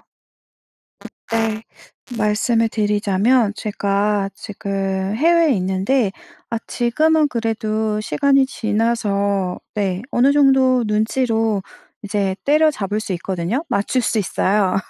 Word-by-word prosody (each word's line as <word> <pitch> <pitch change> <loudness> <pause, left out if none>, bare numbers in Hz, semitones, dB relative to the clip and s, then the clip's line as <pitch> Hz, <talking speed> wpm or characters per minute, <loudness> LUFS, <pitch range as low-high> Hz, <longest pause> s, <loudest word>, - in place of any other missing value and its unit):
그 - - -32 1.2
때 225 -1 -1 0.6
말씀을 225 +2 +1
드리자면 210 +2 +1
제가 200 -1 -1
지금 195 -1 -3
해외에 330 +2 +4
있는데 190 +4 0 0.4
아 230 - -1
지금은 305 +6 +2
그래도 220 -3 -2
시간이 275 +2 +2
지나서 205 -5 -1 0.2
네 195 -2 -1
어느 260 +4 +3
정도 265 -3 +4
눈치로 220 -1 0 0.4
이제 200 -2 -1
때려잡을 285 -9 +2
수 205 -3 -3
있거든요. 185 - -3
맞출 240 +4 0
수 225 - 0
있어요. 195 0 +1
215 Hz, 230 characters per minute, -19 LUFS, 200-245 Hz, 1.2 s, 해외에